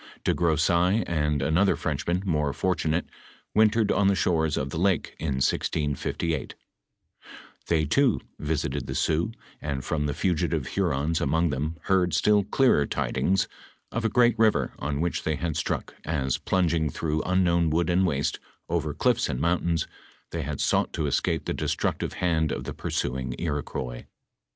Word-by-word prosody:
De -, -, +2 dB
Gro 85 Hz, -3 st, +2 dB
seilles 90 Hz, +7 st, +3 dB
and 75 Hz, -4 st, 0 dB
another 85 Hz, +7 st, +3 dB
Frenchman, 80 Hz, +5 st, -2 dB
more 75 Hz, -5 st, 0 dB
fortunate, 80 Hz, +6 st, 0 dB, 0.5 s
wintered 110 Hz, 0 st, +4 dB
on 100 Hz, -1 st, +3 dB
the 100 Hz, -, +4 dB
shores 80 Hz, -5 st, +1 dB
of 70 Hz, +1 st, -2 dB
the 80 Hz, -, -3 dB
lake 95 Hz, -3 st, +1 dB
in 75 Hz, -4 st, -1 dB
1658; 75 Hz, +2 st, -1 dB, 1.1 s
they 80 Hz, -2 st, +2 dB
too 125 Hz, -, +3 dB, 0.2 s
visited 75 Hz, 0 st, -2 dB
the -, -, -4 dB
Sioux, 80 Hz, +6 st, +1 dB, 0.3 s
and 70 Hz, -4 st, -3 dB
from 75 Hz, -1 st, -1 dB
the 70 Hz, -, -2 dB
fugitive 80 Hz, -6 st, 0 dB
Hurons 80 Hz, -4 st, 0 dB
among 80 Hz, +3 st, +2 dB
them 75 Hz, +4 st, -2 dB
heard 95 Hz, -3 st, +2 dB
still 105 Hz, -1 st, +4 dB
clearer 105 Hz, -, +3 dB
ti -, -, -2 dB
dings 95 Hz, 0 st, +1 dB, 0.4 s
of 115 Hz, -, -2 dB
a 110 Hz, -, +2 dB
great 120 Hz, 0 st, +4 dB
river 110 Hz, -2 st, +3 dB
on 70 Hz, +1 st, -2 dB
which 85 Hz, 0 st, -1 dB
they 80 Hz, -, -1 dB
bad 80 Hz, +1 st, -3 dB
struck, 80 Hz, -, -2 dB
as, 70 Hz, -5 st, -1 dB
plunging 85 Hz, -4 st, +1 dB
through 80 Hz, +2 st, -1 dB
unknown 85 Hz, -3 st, +2 dB
wood 80 Hz, +1 st, +1 dB
and 90 Hz, +2 st, +3 dB
waste, 70 Hz, -4 st, -1 dB, 0.3 s
over 80 Hz, -3 st, -1 dB
cliffs 120 Hz, +4 st, +2 dB
and 65 Hz, -3 st, -2 dB
mountains, 85 Hz, 0 st, +1 dB, 0.5 s
they 85 Hz, -, -2 dB
had 75 Hz, -1 st, -4 dB
sought -, -, +1 dB
to 80 Hz, -, -1 dB
escape 70 Hz, -, 0 dB
the -, -, -1 dB
destructive -, -, -1 dB
hand 80 Hz, -3 st, +1 dB
of -, -, -3 dB
the -, -, -5 dB
pnr^ -, -, -5 dB
suing 65 Hz, -1 st, -2 dB
Iroquois. 70 Hz, -6 st, -4 dB
80 Hz, 165 wpm, -26 LUFS, 75-90 Hz, 1.1 s, wintered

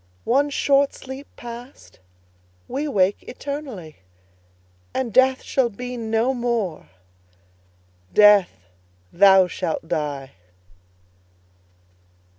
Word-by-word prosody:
One 280 Hz, +4 st, +2 dB
short 280 Hz, 0 st, +2 dB
sleep 265 Hz, +2 st, -9 dB
past, 240 Hz, +2 st, -11 dB, 0.7 s
we 280 Hz, +4 st, -3 dB
wake 195 Hz, -7 st, +1 dB
eternally, 255 Hz, -, -7 dB, 1.0 s
And 250 Hz, -5 st, -2 dB
Death 260 Hz, +2 st, +4 dB
shall 260 Hz, -3 st, +1 dB
be 250 Hz, +4 st, -7 dB
no 225 Hz, +2 st, 0 dB
more: 235 Hz, -9 st, -2 dB, 1.2 s
Death, 210 Hz, -3 st, +6 dB, 0.6 s
thou 190 Hz, 0 st, +6 dB
shalt 165 Hz, -2 st, -4 dB
die! 145 Hz, -4 st, -3 dB
235 Hz, 80 wpm, -22 LUFS, 195-265 Hz, 1.2 s, Death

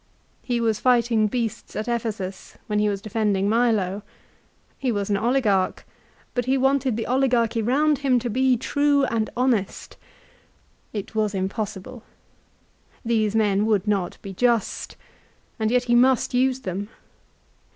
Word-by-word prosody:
He 240 Hz, -2 st, -1 dB
was 225 Hz, -2 st, 0 dB
fighting 235 Hz, -3 st, +3 dB
beasts 230 Hz, -1 st, -4 dB
at 215 Hz, -, -3 dB
Ephesus 215 Hz, -5 st, -4 dB
when 210 Hz, -1 st, -1 dB
he 210 Hz, 0 st, +2 dB
was 200 Hz, 0 st, -4 dB
defending 210 Hz, -3 st, 0 dB
Milo. 215 Hz, -4 st, +1 dB, 0.8 s
He 260 Hz, -2 st, 0 dB
was 205 Hz, -2 st, -2 dB
an 200 Hz, -, +2 dB
oligarch, 215 Hz, -4 st, +1 dB, 0.5 s
but 245 Hz, -1 st, -1 dB
he 265 Hz, +1 st, +2 dB
wanted 265 Hz, -3 st, +1 dB
the 225 Hz, -, -2 dB
oligarchy 240 Hz, -3 st, +1 dB
round 285 Hz, +6 st, +2 dB
him 270 Hz, -3 st, +2 dB
to 245 Hz, 0 st, -2 dB
be 255 Hz, +2 st, +2 dB
true 285 Hz, +3 st, +1 dB
and 225 Hz, -3 st, -1 dB
honest! 240 Hz, -6 st, -1 dB, 0.9 s
It 205 Hz, -1 st, -6 dB
was 215 Hz, -2 st, 0 dB
impossible. 210 Hz, +4 st, -4 dB, 1.0 s
These 220 Hz, -2 st, +1 dB
men 210 Hz, -1 st, +2 dB
would 210 Hz, -2 st, +1 dB
not 195 Hz, -4 st, -1 dB
be 195 Hz, -, -7 dB
just, 235 Hz, +1 st, 0 dB, 0.6 s
and 220 Hz, -1 st, +1 dB
yet 245 Hz, +1 st, +2 dB
he 240 Hz, -1 st, 0 dB
must 255 Hz, +1 st, +3 dB
use 260 Hz, +1 st, +1 dB
them. 200 Hz, -2 st, -4 dB
225 Hz, 140 wpm, -23 LUFS, 210-250 Hz, 1.0 s, fighting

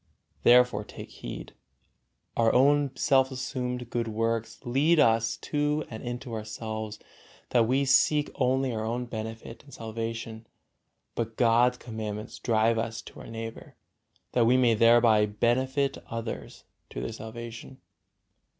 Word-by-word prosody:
Therefore 125 Hz, -3 st, +5 dB
take -, -, -10 dB
heed: -, -, -8 dB, 0.8 s
our 115 Hz, -1 st, +3 dB
own 145 Hz, +2 st, +4 dB
self 130 Hz, 0 st, +3 dB
assumed 125 Hz, -2 st, -4 dB
good 115 Hz, -1 st, -1 dB
works 115 Hz, +1 st, -2 dB
lead 145 Hz, +7 st, +3 dB
us 115 Hz, -4 st, +3 dB
to 150 Hz, 0 st, -1 dB
and 110 Hz, -, -6 dB
into 120 Hz, 0 st, -6 dB
ourselves, 110 Hz, 0 st, -5 dB, 0.5 s
that 115 Hz, -2 st, +3 dB
we 135 Hz, +3 st, +2 dB
seek 145 Hz, +2 st, +3 dB
only 130 Hz, 0 st, +1 dB
our 110 Hz, -1 st, -2 dB
own 120 Hz, +3 st, -2 dB
benefit 110 Hz, 0 st, -7 dB
and 145 Hz, -, -17 dB
salvation; 115 Hz, -1 st, -6 dB, 0.7 s
but 115 Hz, -1 st, -4 dB
God's 120 Hz, +1 st, +4 dB
commandments 110 Hz, -2 st, -6 dB
drive 115 Hz, 0 st, +2 dB
us 115 Hz, 0 st, -3 dB
to -, -, -12 dB
our -, -, -10 dB
neighbor, 115 Hz, 0 st, -8 dB, 0.6 s
that 120 Hz, -2 st, +3 dB
we 125 Hz, +2 st, +5 dB
may 125 Hz, -2 st, +4 dB
thereby 115 Hz, -1 st, +5 dB
benefit 130 Hz, +6 st, 0 dB
others 115 Hz, 0 st, -6 dB, 0.3 s
to -, -, -6 dB
their 65 Hz, -, -4 dB
salvation. 115 Hz, +3 st, -8 dB
115 Hz, 130 wpm, -28 LUFS, 110-125 Hz, 0.8 s, Therefore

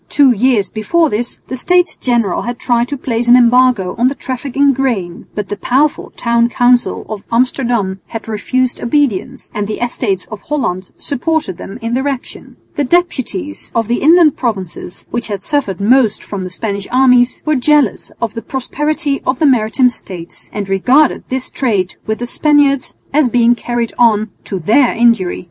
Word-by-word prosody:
Two 280 Hz, -3 st, +5 dB
years 235 Hz, -3 st, +1 dB
before 320 Hz, +9 st, +1 dB
this 235 Hz, +3 st, -2 dB
the 260 Hz, -, -4 dB
States 355 Hz, +6 st, +1 dB
General 235 Hz, -7 st, 0 dB
had 240 Hz, 0 st, -4 dB
tried 240 Hz, -1 st, 0 dB
to 285 Hz, -, -4 dB
place 240 Hz, -2 st, -2 dB
an 240 Hz, -, +7 dB
embargo 245 Hz, -6 st, +3 dB
on 245 Hz, -, +4 dB
the 275 Hz, -, -1 dB
traffic 260 Hz, 0 st, -6 dB
in 280 Hz, 0 st, +4 dB
grain, 230 Hz, -10 st, -2 dB
but 210 Hz, -2 st, -3 dB
the 205 Hz, -, -2 dB
powerful 275 Hz, +7 st, 0 dB
town 235 Hz, 0 st, +2 dB
council 245 Hz, 0 st, +2 dB
of 210 Hz, -2 st, -6 dB
Amsterdam 235 Hz, -5 st, 0 dB
had 225 Hz, -1 st, -7 dB
refused 245 Hz, +4 st, -1 dB
obedience 240 Hz, -6 st, -1 dB
and 205 Hz, -1 st, -2 dB
the 215 Hz, -, -4 dB
Estates 225 Hz, -6 st, -2 dB
of 210 Hz, -2 st, -7 dB
Holland 185 Hz, -11 st, -3 dB
supported 285 Hz, -, -2 dB
them 195 Hz, -, -8 dB
in 230 Hz, +1 st, -2 dB
their 265 Hz, +3 st, 0 dB
action. 270 Hz, -3 st, -6 dB, 0.2 s
The 290 Hz, -, +2 dB
deputies 325 Hz, 0 st, -1 dB
of 225 Hz, -2 st, +1 dB
the 240 Hz, +1 st, -1 dB
inland 320 Hz, 0 st, +5 dB
provinces, 190 Hz, -7 st, -5 dB
which 240 Hz, 0 st, -2 dB
had 200 Hz, -3 st, -5 dB
suffered 255 Hz, -, -1 dB
most 225 Hz, +1 st, +3 dB
from 200 Hz, -2 st, -6 dB
the 185 Hz, -, -5 dB
Spanish 200 Hz, +1 st, -4 dB
armies, 250 Hz, -1 st, +3 dB
were 305 Hz, -1 st, +2 dB
jealous 285 Hz, -3 st, +1 dB
of 230 Hz, -2 st, -2 dB
the 230 Hz, -, -5 dB
prosperity 285 Hz, +4 st, -2 dB
of 255 Hz, -, +1 dB
the 310 Hz, -, +1 dB
maritime 250 Hz, -1 st, +3 dB
States, 180 Hz, -7 st, -8 dB
and 205 Hz, -2 st, -4 dB
regarded 250 Hz, +10 st, +2 dB
this 260 Hz, 0 st, -2 dB
trade 205 Hz, -8 st, -1 dB
with 220 Hz, 0 st, -1 dB
the 240 Hz, -, -4 dB
Spaniard 285 Hz, +1 st, +3 dB, 0.3 s
as 290 Hz, -3 st, +3 dB
being 235 Hz, 0 st, +4 dB
carried 240 Hz, -1 st, -3 dB
on 220 Hz, -3 st, +3 dB
to 195 Hz, -, -3 dB
their 225 Hz, -, +2 dB
injury. 230 Hz, -6 st, +2 dB
240 Hz, 175 wpm, -15 LUFS, 215-270 Hz, 0.3 s, an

